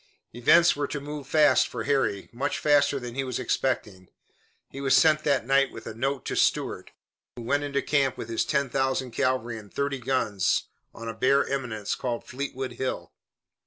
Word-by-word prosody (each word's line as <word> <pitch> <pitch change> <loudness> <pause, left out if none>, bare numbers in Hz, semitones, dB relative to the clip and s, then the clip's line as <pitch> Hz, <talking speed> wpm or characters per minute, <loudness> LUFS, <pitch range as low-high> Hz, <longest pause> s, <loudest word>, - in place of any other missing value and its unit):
Events 170 +8 +5
were 145 0 -2
to 150 - -4
move 145 -1 -7
fast 150 -4 +4
for - - -5
Harry, 135 -8 0
much 120 +4 -2
faster 145 -1 +3
than 120 -2 -7
he 135 +2 -2
was 130 -3 -3
expecting. 110 -7 -2 0.6
He 135 - -7
was 135 -1 +3
sent 155 -1 +4
that 140 -5 +2
night 135 +1 +3
with 110 - -10
a - - -6
note 135 +3 -2
to - - -3
Stuart, - - 0 0.5
who 120 - -8
went 145 +5 0
into 140 -1 -1
camp 140 -3 +1
with - - -6
his 115 -1 0
ten 140 -2 0
thousand 130 -1 -1
cavalry 120 -3 -1
and 105 -2 -15
thirty 140 -1 -2
guns 115 -7 0 0.3
on 115 - -9
a 115 - -3
bare 130 +5 +3
eminence 120 -7 -3
called 120 -2 -3
Fleetwood 130 0 -5
Hill. 130 0 -4
135 Hz, 185 wpm, -26 LUFS, 120-140 Hz, 0.6 s, Events